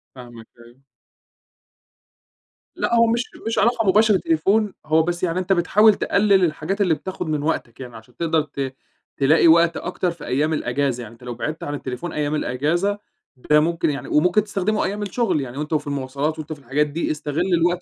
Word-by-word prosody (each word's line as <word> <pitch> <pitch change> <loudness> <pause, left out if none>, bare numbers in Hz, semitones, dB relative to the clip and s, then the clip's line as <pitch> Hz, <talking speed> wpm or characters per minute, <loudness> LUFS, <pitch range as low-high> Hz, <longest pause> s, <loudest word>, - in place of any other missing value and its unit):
فاهمك 120 -3 -12
أيوه. 120 +3 -18 1.9
لأ، 235 - 0
هو 230 0 +5
مش 235 +2 +1 0.2
مش 225 - 0
علاقة 225 -1 +2
مباشرة 210 +1 +4
تليفون، 195 +7 +1
هو 160 +1 +3
بس 175 +1 -3
يعني 175 +1 0
أنت 185 +1 +1
بتحاول 210 +5 +4
تقلل 200 -2 +2
الحاجات 170 +6 -3
اللي 180 -4 +3
بتاخد 180 +1 -5
من 150 -2 -1
وقتك 150 -7 -3
يعني، 125 -3 -9
عشان 110 +2 -15
تقدر 165 -2 +1
ت 135 -3 -5 0.4
تلاقي 150 +5 +4
وقت 170 0 +5
أكتر 180 0 -2
في 170 -3 -10
أيّام 150 +5 0
الأجازة، 130 -3 -1
يعني 115 - -11
أنت 115 - -18
لو 125 - -5
بعدت 155 +6 -4
عن 145 - -4
التليفون 145 +4 -5
أيّام 150 0 -1
الأجازة، 170 +11 -1 0.4
ده 150 +4 +2
ممكن 165 +1 0
يعني 140 -1 -4
وممكن 180 +7 +3
تستخدمه 205 +1 -1
أيّام 205 +2 -3
الشغل 200 - 0
يعني 130 0 -7
وأنت 150 +2 -4
وفي 150 -1 -1
المواصلات 140 +3 -3
وأنت 155 0 -5
في 150 - -13
الحاجات 140 +3 0
دي، 155 +4 -2
استغل 155 +4 -2
الوقت 175 +1 +2
160 Hz, 185 wpm, -22 LUFS, 140-185 Hz, 1.9 s, هو